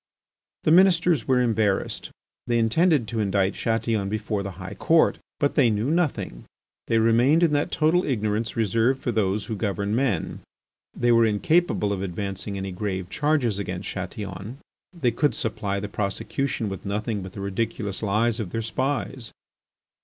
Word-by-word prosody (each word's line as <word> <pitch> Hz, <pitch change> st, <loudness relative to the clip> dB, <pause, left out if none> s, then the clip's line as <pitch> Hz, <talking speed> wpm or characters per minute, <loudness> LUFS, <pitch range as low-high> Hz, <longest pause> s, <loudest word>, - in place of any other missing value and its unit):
The -, -, +3 dB
Ministers 175 Hz, -, +4 dB
were 130 Hz, -1 st, +3 dB
embarrassed. 110 Hz, -5 st, 0 dB, 0.4 s
They 120 Hz, -1 st, +2 dB
intended 130 Hz, +3 st, +3 dB
to 115 Hz, -, -2 dB
indict 100 Hz, -1 st, +1 dB
Chatillon 115 Hz, -3 st, -1 dB
before 105 Hz, -1 st, -2 dB
the 100 Hz, -1 st, -5 dB
High 90 Hz, -1 st, -7 dB
Court. 165 Hz, 0 st, +3 dB, 0.2 s
But 145 Hz, -, +1 dB
they 130 Hz, -5 st, +4 dB
knew 110 Hz, +6 st, 0 dB
nothing; 160 Hz, -, -1 dB, 0.4 s
they 115 Hz, -, +2 dB
remained 120 Hz, +9 st, +4 dB
in 160 Hz, -3 st, +3 dB
that 145 Hz, 0 st, +1 dB
total 165 Hz, +4 st, +2 dB
ignorance 110 Hz, -3 st, -1 dB
reserved 115 Hz, +4 st, +2 dB
for 120 Hz, -, -2 dB
those 105 Hz, -2 st, 0 dB
who 110 Hz, -, -4 dB
govern 100 Hz, 0 st, -1 dB
men. 120 Hz, -9 st, -1 dB, 0.6 s
They 120 Hz, 0 st, +2 dB
were 115 Hz, -1 st, +5 dB
incapable 110 Hz, 0 st, +1 dB
of 95 Hz, -, -3 dB
advancing 100 Hz, +1 st, -4 dB
any 95 Hz, 0 st, -4 dB
grave 95 Hz, -1 st, -4 dB
charges 145 Hz, -9 st, +1 dB
against 95 Hz, -1 st, -4 dB
Chatillon. 95 Hz, +4 st, -6 dB, 0.3 s
They 165 Hz, -10 st, 0 dB
could 145 Hz, +5 st, +1 dB
supply 100 Hz, -4 st, -2 dB
the 105 Hz, -, -4 dB
prosecution 105 Hz, +5 st, -2 dB
with 95 Hz, -1 st, -6 dB
nothing 105 Hz, +1 st, -2 dB
but 95 Hz, -1 st, -8 dB
the -, -, -8 dB
ridiculous 100 Hz, 0 st, -3 dB
lies 110 Hz, +2 st, +1 dB
of 105 Hz, -5 st, -3 dB
their 115 Hz, +5 st, -3 dB
spies. 130 Hz, 0 st, -2 dB
110 Hz, 160 wpm, -25 LUFS, 100-130 Hz, 0.6 s, were